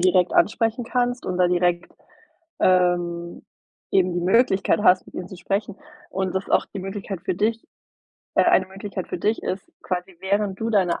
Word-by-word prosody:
direkt 180 0 +3
ansprechen 225 +2 +2
kannst 245 +1 -1
und 185 - -2
da 180 -1 +3
direkt, 175 0 +1 0.7
ähm, 175 -2 +1 0.5
eben 185 -2 +3
die 175 - -1
Möglichkeit 195 +2 +3
hast, 185 -3 +5
mit - - -16
ihnen 180 - -5
zu 185 - -9
sprechen 195 +3 -2 0.3
und 190 -1 -2
das 190 +1 -2
auch - - +3
die - - -3
Möglichkeit 195 -1 -5
für - - -1
dich 220 +4 -1 0.7
äh, - - +5
eine - - +4
Möglichkeit 195 0 -6
für - - -4
dich 215 +6 0
ist, 190 +1 -4
quasi 180 0 -4
während 195 0 -1
du 225 +1 -1
deine 190 -5 +2
190 Hz, 175 wpm, -23 LUFS, 180-205 Hz, 0.7 s, hast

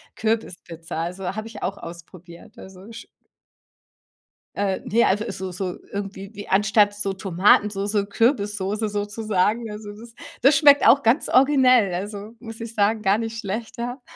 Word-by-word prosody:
Kürbispizza, 175 -7 -3
also, 180 +2 -5
habe 215 +1 -5
ich 225 - -11
auch 195 +2 -3
ausprobiert. 170 0 -12
Also, 190 +3 -13
sch 230 - -10 1.5
Äh, 195 -2 -1
ne, 230 +3 +2
also, 210 +3 0
so 190 0 -6
so 180 0 -5
irgendwie 200 0 -6
wie 205 0 -9
anstatt 205 +1 +3
so 200 -1 -2
Tomatensoße, 200 +2 +2
Kürbissoße 210 -2 0
sozusagen. 210 +1 -1
Also, 210 0 -8
das 230 +2 -13 0.3
das 275 +4 +5
schmeckt 285 -3 +6
auch 270 +4 +6
ganz 240 +8 +2
originell, 255 -7 +4
also, 205 +3 -6
muss 225 -1 -10
ich 230 0 -7
sagen, 215 +1 +1
gar 195 +1 +2
nicht 225 0 -4
schlechter. 235 +4 -5
205 Hz, 145 wpm, -23 LUFS, 195-225 Hz, 1.5 s, schmeckt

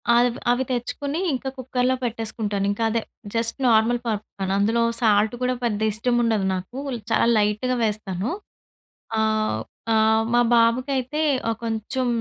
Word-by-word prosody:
అవి 245 +1 +5 0.2
అవి 250 +2 +1
తెచ్చుకొని 280 +5 -2
ఇంకా 265 0 -2
కుక్కరులో 255 0 0
పెట్టేసుకుంటాను. 220 -3 -2
ఇంకదే 225 +2 0 0.3
జస్ట్ 230 +2 0
నార్మల్ 230 +1 +4
పాప్‌కార్న్. 200 -3 -3
అందులో 225 +3 +2 0.2
సాల్ట్ 215 0 +3
కూడా 250 0 +1
పెద్దగా 220 -1 +1
ఇష్టం 240 +3 0
ఉండదు 220 -4 +1
నాకు, 185 +8 -5 0.3
చాలా 230 - +3
లైట్‌గా 210 +5 +1
వేస్తాను. 210 -2 -2 0.9
ఆహ్, 215 - +1 0.3
ఆహ్, 220 0 +4
మా 240 - +5
బాబుకయితే 255 +5 +1 0.3
ఆహ్, 225 - -1
కొంచెం 225 +3 -2
225 Hz, 130 wpm, -23 LUFS, 215-245 Hz, 0.9 s, అవి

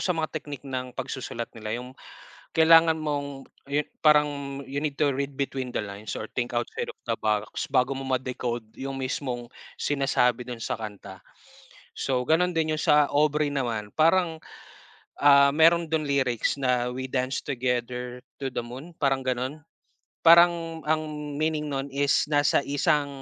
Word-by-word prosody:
sa 185 - 0
mga 160 -1 -2
technique 145 -2 -6
ng 130 -1 -4
pagsusulat 130 -3 -4
nila 110 0 -4
'yung 125 +1 -9 0.6
kailangan 165 0 +6
mong 145 -3 -4 0.2
ayon 145 +1 -1 0.2
parang 150 -1 +6 0.4
you 140 +2 -3
need 145 -2 -2
to 150 - +4
read 140 +1 -2
between 130 -2 -3
the - - -1
lines 100 +1 -7
or 110 - -5
think 120 -1 -1
outside 120 -1 -3
of - - -57
the - - +1
box 105 -1 0
bago 130 +1 +2
mo 135 - -5
ma-decode 125 -3 -2
'yung 135 0 -5
mismong 125 -2 -3 0.3
sinasabi 125 -4 +1
do'n 120 -2 -7
sa - - -2
kanta. 100 -3 -9 0.7
So, 130 -2 0
ganon 175 +6 +2
din 160 -1 +1
'yung - - -6
sa 150 -1 +5
Aubrey 150 0 +2
naman 115 -7 -2
parang, 165 0 +3 0.8
ah, 140 -1 +7
meron 165 +2 +4
do'n 155 -2 0
lyrics 130 -5 +1
na, 125 -1 +1
"We 130 0 -5
dance 130 0 -1
together 125 -1 -3 0.2
to 135 -2 -4
the - - -1
moon," 130 +8 -10
parang 135 -1 +1
gano'n. 130 +4 -2 0.6
Parang 170 -1 +5
ang 150 -1 -2
meaning 155 -1 -1
no'n 135 0 -2
is 140 +1 +2
nasa 145 -1 +3
isang, 145 +1 +2
135 Hz, 160 wpm, -26 LUFS, 125-150 Hz, 0.8 s, ah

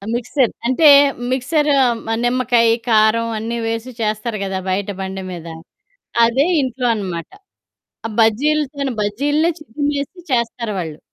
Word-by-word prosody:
Mixer. 245 +1 0 0.2
అంటే 295 +5 +4 0.4
mixer 295 +4 0 0.4
మ - - -4
నిమ్మకాయి, 240 -2 +3 0.2
కారం 220 +1 +3
అన్నీ 230 +2 -3
వేసి 230 +2 -3
చేస్తారు 215 +1 -2
కదా! 190 -1 -3
బయట 195 +2 -1
బండి 190 0 -5
మీద. 170 -2 -8 0.8
అదే 250 +5 +2 0.2
ఇంట్లో 255 -1 -2
అనమాట. 180 -5 -5 0.8
ఆ - - -3
బజ్జీలుతోను 280 +4 +1
బజ్జీల్నే 290 +10 +1
చిదిమేసి 290 +4 -4
చేస్తారు 235 -2 -1
వాళ్ళు. 160 -4 -5
235 Hz, 120 wpm, -18 LUFS, 215-275 Hz, 0.8 s, అంటే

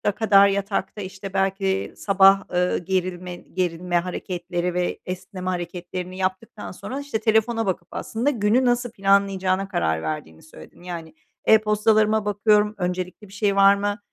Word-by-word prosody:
kadar 200 -3 +5
yatakta, 200 +1 -2
işte, 190 0 -8
belki 195 0 0
sabah, 195 0 +5
ııı, 180 0 +1
gerilme 180 0 -3
gerilme 175 0 -2
hareketleri 175 0 -3
ve 180 0 -1
esneme 185 0 -5
hareketlerini 180 +1 -5
yaptıktan 190 +3 -4
sonra, 260 +8 -6
işte, 285 -6 -3
telefona 225 +1 +1
bakıp 180 -3 -2
aslında 235 +6 -2
günü 235 0 +2
nasıl 245 -1 +1
planlayacağına 195 -2 +1
karar 80 - -1
verdiğini 80 0 -5
söyledin. 160 - -15
Yani, 170 -3 -7 0.3
"E-postalarıma 215 0 +3
bakıyorum, 210 +1 +2
öncelikli 180 +2 -4
bir 190 - -16
şey 200 -1 0
var 195 0 +6
mı, 205 +1 -2
195 Hz, 135 wpm, -23 LUFS, 180-210 Hz, 0.3 s, var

